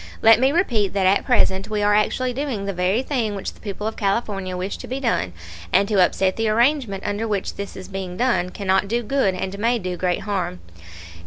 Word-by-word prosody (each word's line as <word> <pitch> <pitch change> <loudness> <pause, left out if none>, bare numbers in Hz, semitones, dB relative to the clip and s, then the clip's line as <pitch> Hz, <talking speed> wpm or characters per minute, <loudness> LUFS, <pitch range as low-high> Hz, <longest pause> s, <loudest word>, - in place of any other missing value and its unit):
Let 225 0 +7
me 265 +2 +3
repeat 240 - +1
that 195 -2 +1
at 190 +2 +3
present 195 -6 +2
we 210 -1 -1
are 205 0 +4
actually 250 +4 +1
doing 255 -7 -3
the 200 - -2
very 185 +7 +1
thing 235 -7 -1
which 195 - -5
the - - -21
people 210 0 -6
of 220 - -2
California 195 -3 -1
wish 185 +2 -3
to - - -9
be 260 +2 -3
done, 230 - 0 0.4
and 200 - +4
to 200 -4 +4
upset 185 +1 +1
the 225 -1 +1
arrangement 235 -3 +1
under 205 +2 -2
which 205 -3 -2
this 200 0 -7
is 190 - -8
being 190 -2 -6
done 240 -8 +1
cannot 190 0 0
do 235 +3 -1
good 230 -6 +1
and 190 +2 -4
may 235 +3 +2
do 185 -4 -4
great 180 0 0
harm. 190 - -3
205 Hz, 220 wpm, -22 LUFS, 190-235 Hz, 0.4 s, Let